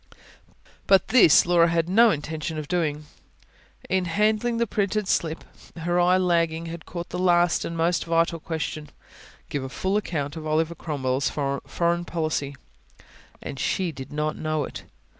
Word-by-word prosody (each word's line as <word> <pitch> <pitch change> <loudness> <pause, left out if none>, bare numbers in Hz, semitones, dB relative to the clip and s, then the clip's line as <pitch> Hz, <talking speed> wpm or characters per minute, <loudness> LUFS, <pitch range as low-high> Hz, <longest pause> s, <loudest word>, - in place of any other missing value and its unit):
But 195 -2 +4
this 225 - +6
Laura 170 -1 +4
had 165 -1 0
no 225 +6 +5
intention 155 -1 -3
of 155 -1 -5
doing. 155 -4 -1 0.8
In 190 -1 +1
handling 215 +6 +1
the 235 - +2
printed 205 -1 -1
slip, 160 -3 -1 0.3
her 175 +2 0 0.2
lagging 170 -2 +1
eye - - -6
had 170 0 -9
caught 170 0 -6
the 180 - -4
last 175 -1 +3
and 165 - -5
most 170 +1 +1
vital 165 0 +1
question: 155 -1 -4 0.6
"Give 140 - -2
a 130 - -5
full 190 +9 -1
account 150 -8 -3
of 160 -1 -6
Oliver 160 +2 +1
Cromwell's 140 -5 -2
Foreign 170 +5 -1
Policy." 155 -4 -2 0.9
And 135 - -6
she 180 +5 0
did 135 -2 -9
not 150 +1 -2
know 155 -1 -2
it! - - -8
165 Hz, 155 wpm, -25 LUFS, 155-180 Hz, 0.9 s, this